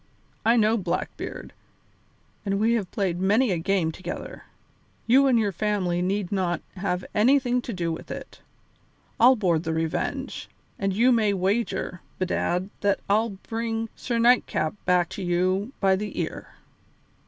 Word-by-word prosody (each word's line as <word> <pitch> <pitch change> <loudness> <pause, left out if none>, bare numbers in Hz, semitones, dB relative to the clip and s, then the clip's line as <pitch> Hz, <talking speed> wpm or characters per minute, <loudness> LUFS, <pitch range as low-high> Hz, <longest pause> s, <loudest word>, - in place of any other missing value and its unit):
"I 230 +2 +4
know 220 +1 +3
Blackbeard, 180 -5 -4 0.9
and 195 -1 -1
we 225 +2 +3
have 210 -6 -1
played 185 -5 -1
many 210 +5 +3
a 175 - 0
game 170 -1 +1
together. 185 - -7 0.6
You 270 +4 +5
and 255 -3 +4
your 210 -3 +1
family 185 -2 0
need 195 +1 -1
not 180 -4 -1
have 185 -1 -2
anything 250 +2 +3
to 240 - -6
do 175 -5 -2
with 160 - -7
it. - - -8 0.8
I'll 250 +3 +7
board 175 -8 +1
the 160 -1 -2
Revenge, 160 0 -3 0.3
and 195 0 0
you 235 +7 +4
may 215 -4 +3
wager, 190 -1 -1 0.2
bedad, 185 +1 -1
that 200 -1 +1
I'll 220 +3 +3 0.2
bring 225 0 -2
Sir 240 -2 -2
Nightcap 230 -9 +3
back 180 -1 +3
to - - -6
you 185 +5 0
by 190 -1 +4
the 210 +2 -4
ear." - - -4
200 Hz, 150 wpm, -25 LUFS, 180-225 Hz, 0.9 s, I'll